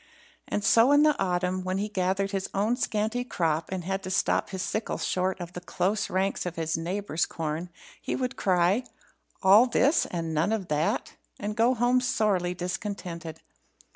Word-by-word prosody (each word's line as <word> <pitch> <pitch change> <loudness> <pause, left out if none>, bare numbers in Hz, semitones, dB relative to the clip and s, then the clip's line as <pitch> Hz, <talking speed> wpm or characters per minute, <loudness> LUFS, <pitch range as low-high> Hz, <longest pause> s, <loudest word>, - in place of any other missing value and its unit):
And 205 - -2
so 230 +6 +5
in 290 +1 +6
the 305 -1 +4
autumn, 180 0 0
when 185 +1 -1
he 205 +2 -1
gathered 195 0 -1
his 195 -1 -2
own 210 +5 +2
scanty 225 0 -1
crop 165 -9 -1
and 185 -2 -3
had 195 +2 -2
to 185 - -6
stop 185 - +1
his 190 -1 -4
sickle 215 - -2
short 185 +1 -1
of 175 0 -7
the 180 - -6
close 195 +4 -1
ranks 190 +1 0
of 175 - -5
his 160 -1 -1
neighbour's 170 0 -1
corn, 160 +2 -4 0.3
he - - -2
would 255 0 -2
cry, 185 +5 +2 0.6
"All 205 +6 +7
this, 275 +5 +3
and 165 -2 -3
none 160 +7 +1
of 200 -5 -3
that?" 150 +1 -1 0.2
and 210 +1 -3
go 235 +3 +3
home 245 +2 +3
sorely 205 -8 +1
discontented. 180 -3 -5
190 Hz, 175 wpm, -27 LUFS, 175-215 Hz, 0.6 s, All